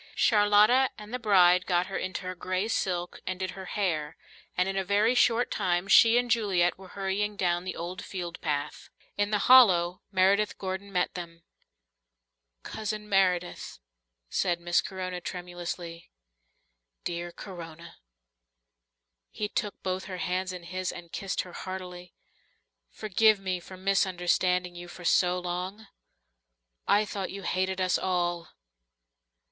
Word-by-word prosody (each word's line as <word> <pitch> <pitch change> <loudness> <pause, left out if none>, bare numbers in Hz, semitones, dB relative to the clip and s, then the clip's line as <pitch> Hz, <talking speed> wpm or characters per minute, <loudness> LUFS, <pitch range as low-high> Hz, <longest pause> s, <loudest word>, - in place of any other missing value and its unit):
Charlotta 210 +4 +5
and 210 +2 -10
the 250 - -2
bride 185 -5 +5
got 180 -1 +2
her 195 - -7
into 185 +1 -3
her 185 0 -4
grey 185 +3 -2
silk 180 -5 -2
and 185 0 -3
did 185 -1 -2
her 190 0 -9
hair, 165 -7 -2 0.4
and 180 +1 +2
in 195 - -2
a 195 - 0
very 205 +5 +3
short 245 -1 +3
time 175 +1 0
she 225 +3 +7
and 245 -1 0
Juliet 190 -7 +2
were 190 0 -13
hurrying 200 +2 -2
down 175 -2 0
the 185 - -4
old 180 +3 -6
field 175 -3 -6
path. 145 -2 -3 0.3
In 205 0 0
the 210 - +2
hollow 180 -9 +6
Meredith 200 +2 +2
Gordon 190 +1 -5
met 180 -2 0
them. 170 -2 -8 1.2
"Cousin 215 -1 -5
Meredith," 185 -3 0 0.5
said 175 - 0
Miss 175 0 +2
Corona 185 -1 -5
tremulously. 175 -1 -6 0.9
"Dear 175 0 -4
Corona." 170 -3 -10 1.3
He 210 - -3
took 205 -1 -4
both 185 0 -2
her 185 -2 -6
hands 185 +1 -2
in 180 -1 -8
his, 185 +2 -3
and 170 -1 -11
kissed 195 -1 -2
her 180 - -11
heartily. 180 -1 -7 0.7
"Forgive 215 0 +3
me 185 -2 -2
for 185 +2 -12
misunderstanding 180 -1 +1
you 175 0 -9
so 180 +1 +1
long. 180 +4 -4 1.0
I 210 +1 +4
thought 195 -2 -4
you 195 0 -7
hated 185 0 -1
us 185 -1 +2
all." 175 -2 -1
185 Hz, 140 wpm, -28 LUFS, 175-200 Hz, 1.3 s, she